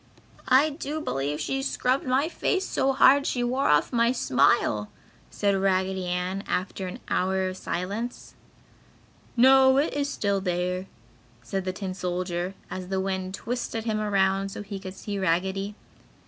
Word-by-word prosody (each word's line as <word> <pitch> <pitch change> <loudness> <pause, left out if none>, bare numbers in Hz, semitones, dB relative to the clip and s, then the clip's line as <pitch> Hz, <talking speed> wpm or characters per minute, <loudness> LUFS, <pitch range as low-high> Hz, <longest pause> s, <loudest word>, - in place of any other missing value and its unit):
"I 275 +4 +5
do 300 +1 -4
believe 145 - -2
she 270 - -1
scrubbed 265 -1 0
my 265 +4 +2
face 380 +2 -1
so 270 - +1
hard 275 +1 +5
she 245 - 0
wore 255 +3 +1
off 150 - +3
my 235 0 +3
smile!" 125 - +2 0.4
said 200 -1 +1
Raggedy 190 -1 0
Ann, 180 +2 -2
after 185 +1 -2
an 180 - -6
hour 190 +1 +1
of 185 - -4
silence. 200 +7 -4 1.0
"No, 265 +1 +6
it 290 +3 +2
is 285 0 -1
still 200 -7 0
there!" 180 0 -1 0.6
said 195 -2 -3
the 185 - -2
tin 190 -1 -4
solder, 180 0 -3 0.2
as 185 -1 -5
the 190 0 -1
wind 190 0 -2
twisted 230 0 -3
him 220 -2 -1
around 195 -2 +1
so 200 - -7
he 200 -1 -6
could 190 0 -8
see 200 0 -5
Raggedy. 190 +3 0
195 Hz, 155 wpm, -26 LUFS, 185-250 Hz, 1.0 s, No